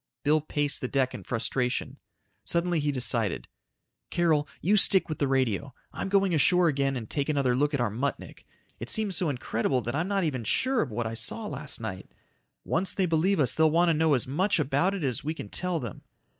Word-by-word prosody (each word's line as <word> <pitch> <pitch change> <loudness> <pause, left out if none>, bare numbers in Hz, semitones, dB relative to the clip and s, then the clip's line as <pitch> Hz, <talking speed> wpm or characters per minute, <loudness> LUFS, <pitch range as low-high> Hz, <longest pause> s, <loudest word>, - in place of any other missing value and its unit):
Bill 150 +1 +3
paced 145 -1 -1
the 125 - -1
deck 130 -1 0
in - - -7
frustration. 125 +1 -2 0.4
Suddenly 170 0 0
he 145 0 0
decided, 120 -6 -1 0.6
"Carol, 160 -4 +2
you 200 +5 +2
stick 195 -2 +4
with 155 - -4
the 140 - +2
radio. 130 0 0 0.2
I'm - - -4
going 195 -2 +3
ashore 175 +3 +4
again 135 -3 +1
and 115 -3 -6
take 140 +4 -2
another 140 -4 +2
look 145 +3 +1
at - - -2
our 120 -4 0
Muttnik. 130 +5 -4 0.4
It 115 - -5
seems 210 -4 0
so 170 -1 0
incredible 125 -1 -1
that 120 +1 -4
I'm 160 +5 -1
not 200 -1 0
even 135 -7 -1
sure 260 - +1
of 145 - -2
what 115 +1 -3
I 110 - -3
saw 115 - -3
last 145 -6 -7
night. 95 -5 -6 0.5
Once 180 +4 0
they 190 - +2
believe 175 +3 +2
us 135 - +3
they'll 160 0 +4
want 170 +2 +3
to - - +4
know 155 -1 +3
as 125 - 0
much 185 +11 +1
about 150 +7 +1
it 190 - -4
as 130 -3 -1
we 155 +3 -2
can 105 - -8
tell 180 - -1
them." 120 -7 -7
145 Hz, 210 wpm, -28 LUFS, 125-175 Hz, 0.6 s, stick